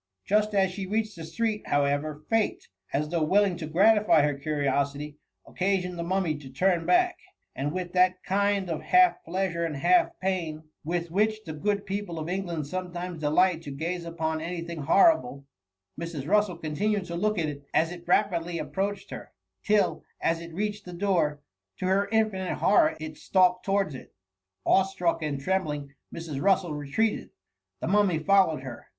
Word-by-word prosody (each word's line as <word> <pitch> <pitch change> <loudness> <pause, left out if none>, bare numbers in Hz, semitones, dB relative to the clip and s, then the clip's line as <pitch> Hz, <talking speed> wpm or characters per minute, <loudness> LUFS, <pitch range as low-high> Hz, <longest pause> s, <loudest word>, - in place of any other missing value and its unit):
Just 210 +1 +2
as 190 -1 +3
she 190 0 -5
reached 215 +1 -1
the 165 - -8
street, 215 +5 -2
however, 145 +1 0
fate, 225 -2 0 0.2
as 150 +2 -1
though 170 0 -1
willing 195 +4 +3
to 155 - -5
gratify 200 0 +4
her 145 0 +2
curiosity, 140 0 -2 0.3
occasioned 185 -1 -1
the 170 - -4
Mummy 180 -2 0
to 135 -3 -11
turn 170 +4 +1
back; 360 0 +3 0.4
and 140 +2 -2
with 180 0 -4
that 185 0 +3
kind 200 0 +1
of 165 -3 -3
half 365 0 +4
pleasure 170 -1 -2
and 165 -3 -2
half 350 - +4
pain, 170 -5 -2 0.2
with 170 +1 -2
which 215 +3 +1
the 160 - -6
good 200 +6 -1
people 195 -3 -4
of 155 0 -4
England 175 -4 -3
sometimes 180 +1 -5
delight 165 +3 +2
to 150 - -8
gaze 170 +5 -3
upon 160 -1 -3
any 170 +1 -4
thing 170 -1 -6
horrible, 140 - +3 0.5
Mrs. 165 -4 -5
Russel 205 -2 +2
continued 190 +6 -1
to 170 -1 -6
look 210 +4 0 0.3
as 160 +1 +2
it 175 -1 -10
rapidly 175 -3 +1
ap - - -6
proached 200 +1 -2
her, - - -8 0.3
till, 210 -1 +2 0.2
as 165 0 0
it 170 0 -9
reached 210 +4 -3
the 180 - -9
door, 170 -6 0 0.4
to - - -4
her 195 +2 +2
infinite 215 -5 0
horror 205 - +3
it 155 -1 -7
stalked 180 -1 +2
towards 195 -5 0
it. 130 - -11 0.5
Awe 190 - +5
struck 180 -3 -1
and 150 -3 -2
trembling, 150 -4 -2 0.2
Mrs. 160 -5 -5
Russel 190 -4 +2
retreated. 150 +10 -1 0.5
The - - -2
Mummy 195 -2 +3
followed 185 -5 +3
her. 130 -3 -9
175 Hz, 170 wpm, -27 LUFS, 155-195 Hz, 0.5 s, Awe